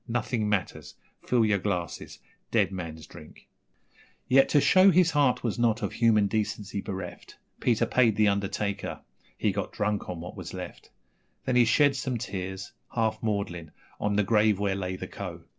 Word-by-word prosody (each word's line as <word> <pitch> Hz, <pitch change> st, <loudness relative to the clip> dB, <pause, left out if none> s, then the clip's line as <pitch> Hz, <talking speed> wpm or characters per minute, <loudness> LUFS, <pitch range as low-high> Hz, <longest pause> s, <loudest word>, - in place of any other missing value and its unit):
Nothing 115 Hz, -2 st, -1 dB
matters! 100 Hz, -3 st, -2 dB, 0.3 s
Fill 120 Hz, -3 st, +3 dB
your 105 Hz, -2 st, +2 dB
glasses 90 Hz, -4 st, -4 dB, 0.3 s
dead 105 Hz, -4 st, +2 dB
man's 80 Hz, -4 st, -6 dB
drink...... 75 Hz, -2 st, -14 dB, 0.8 s
Yet, 135 Hz, +1 st, +5 dB
to 145 Hz, -, +4 dB
show 185 Hz, +6 st, +6 dB
his 175 Hz, -2 st, +4 dB
heart 145 Hz, -4 st, +2 dB
was 115 Hz, -1 st, -2 dB
not 115 Hz, -1 st, +2 dB
of 100 Hz, -, -2 dB
human 110 Hz, -3 st, +3 dB
decency 105 Hz, -1 st, -2 dB
bereft, 95 Hz, -2 st, -7 dB, 0.2 s
Peter 115 Hz, -1 st, +2 dB
paid 115 Hz, -2 st, +3 dB
the 105 Hz, 0 st, +3 dB
undertaker. 100 Hz, 0 st, -2 dB, 0.4 s
He -, -, +1 dB
got -, -, -3 dB
drunk 105 Hz, 0 st, -2 dB
on 90 Hz, -2 st, -5 dB
what 85 Hz, -, -8 dB
was -, -, -7 dB
left; -, -, -8 dB, 0.6 s
Then 130 Hz, -, 0 dB
he 120 Hz, -1 st, +6 dB
shed 140 Hz, +4 st, +4 dB
some 130 Hz, -2 st, -2 dB
tears, 95 Hz, -1 st, -5 dB, 0.2 s
half 110 Hz, -2 st, 0 dB
maudlin, 100 Hz, -7 st, -3 dB, 0.3 s
on 105 Hz, 0 st, 0 dB
the 105 Hz, -, +3 dB
grave 105 Hz, -1 st, +3 dB
where 100 Hz, -1 st, 0 dB
lay 95 Hz, -1 st, -3 dB
the -, -, -6 dB
Co. -, -, -7 dB
105 Hz, 170 wpm, -27 LUFS, 95-120 Hz, 0.8 s, show